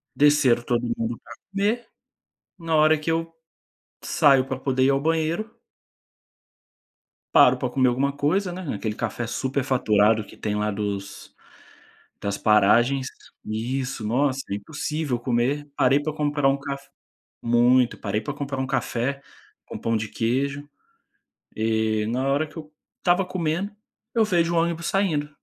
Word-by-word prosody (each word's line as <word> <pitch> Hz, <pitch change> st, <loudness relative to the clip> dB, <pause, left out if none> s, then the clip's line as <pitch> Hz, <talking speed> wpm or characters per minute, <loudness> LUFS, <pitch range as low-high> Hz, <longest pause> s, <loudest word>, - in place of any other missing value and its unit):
desceram 145 Hz, -5 st, +4 dB
todo 120 Hz, -1 st, 0 dB
mundo 115 Hz, +1 st, -3 dB
pra -, -, -11 dB, 0.2 s
comer, 210 Hz, +4 st, 0 dB, 0.7 s
na 165 Hz, -1 st, -1 dB
hora 155 Hz, +1 st, +5 dB
que 155 Hz, +2 st, -2 dB
eu 165 Hz, 0 st, -2 dB, 0.7 s
saio 135 Hz, -2 st, +4 dB
para 130 Hz, -1 st, -4 dB
poder 130 Hz, -1 st, +1 dB
ir 135 Hz, -, +4 dB
ao 135 Hz, 0 st, +2 dB
banheiro 165 Hz, +7 st, 0 dB, 1.8 s
paro -, -, +7 dB
para -, -, -2 dB
comer 130 Hz, -2 st, +3 dB
alguma 135 Hz, +3 st, +1 dB
coisa, 170 Hz, +7 st, 0 dB
né, 185 Hz, +1 st, -6 dB
naquele 110 Hz, -6 st, -3 dB
café 120 Hz, -, -3 dB
superfaturado 115 Hz, -5 st, +1 dB
que -, -, -15 dB
tem 105 Hz, -1 st, -2 dB
lá 105 Hz, 0 st, 0 dB
dos 100 Hz, -1 st, -5 dB, 0.9 s
das 100 Hz, -1 st, -2 dB
paragens 115 Hz, +6 st, +3 dB, 0.4 s
isso, 125 Hz, +3 st, -3 dB
nossa, 130 Hz, +4 st, +1 dB
é 100 Hz, -, -1 dB
impossível 145 Hz, +4 st, -3 dB
comer. 130 Hz, +5 st, -1 dB
Parei 135 Hz, +3 st, +4 dB
para 155 Hz, +1 st, -3 dB
comprar 145 Hz, -2 st, 0 dB
um 135 Hz, -, +1 dB
caf 140 Hz, 0 st, -7 dB, 0.5 s
muito. 120 Hz, +1 st, +3 dB
Parei 105 Hz, +1 st, -2 dB
pra 140 Hz, +6 st, -5 dB
comprar 140 Hz, -1 st, -4 dB
um 130 Hz, -, -1 dB
café 135 Hz, +1 st, -2 dB, 0.4 s
com -, -, -8 dB
pão 115 Hz, 0 st, 0 dB
de 110 Hz, 0 st, -3 dB
queijo, 140 Hz, +6 st, -2 dB, 0.9 s
e 110 Hz, -1 st, 0 dB
na 125 Hz, +4 st, -1 dB
hora 145 Hz, +3 st, +1 dB
que -, -, -19 dB
eu 155 Hz, -1 st, -9 dB, 0.3 s
estava 180 Hz, +2 st, +2 dB
comendo, 180 Hz, +2 st, -2 dB, 0.4 s
eu 225 Hz, -, +4 dB
vejo 170 Hz, -5 st, +1 dB
o -, -, +2 dB
ônibus 170 Hz, 0 st, 0 dB
saindo 160 Hz, -7 st, 0 dB
135 Hz, 145 wpm, -24 LUFS, 115-155 Hz, 1.8 s, paro